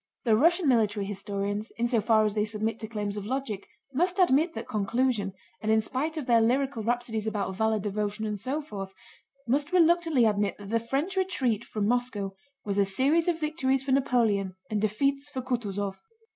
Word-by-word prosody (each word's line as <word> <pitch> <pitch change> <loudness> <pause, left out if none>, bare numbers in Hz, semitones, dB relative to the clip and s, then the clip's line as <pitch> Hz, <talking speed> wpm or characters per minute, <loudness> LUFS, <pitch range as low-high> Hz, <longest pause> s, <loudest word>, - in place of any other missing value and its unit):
The 225 -4 +4
Russian 335 - +3
military 215 -5 +2
historians 200 +2 -3
in 235 +1 +1
so 235 -2 +2
far 215 0 +4
as 210 - 0
they 210 0 +1
submit 220 +1 -2
to 220 - -4
claims 210 -2 -3
of 205 - -5
logic 245 -6 -3 0.3
must 355 +7 +1
admit 330 -2 +3
that - - -5
conclusion, 215 0 0 0.3
and 215 - 0
in 220 - +5
spite 280 +8 -2
of 300 - -3
their 235 -2 +4
lyrical 260 +1 +1
rhapsodies 225 -1 -1
about 200 -3 -2
valor, 220 +2 +1
devotion, 210 +1 -2
and 210 -1 -3
so 275 +8 -2
forth, 195 -8 -7 0.5
must 285 +6 +1
reluctantly 335 -6 +4
admit 205 -2 +1
that 205 0 -9
the 230 - +3
French 275 - -2
retreat 260 - 0
from 210 -2 -2
Moscow 230 -5 -1 0.3
was 200 -1 0
a - - +6
series 275 - +2
of 340 -2 +1
victories 270 -4 0
for 270 - -2
Napoleon 225 -8 +2 0.2
and 210 -1 0
defeats 275 +7 0
for 260 -3 -5
Kutúzov. 205 -6 -2
230 Hz, 185 wpm, -28 LUFS, 210-275 Hz, 0.5 s, a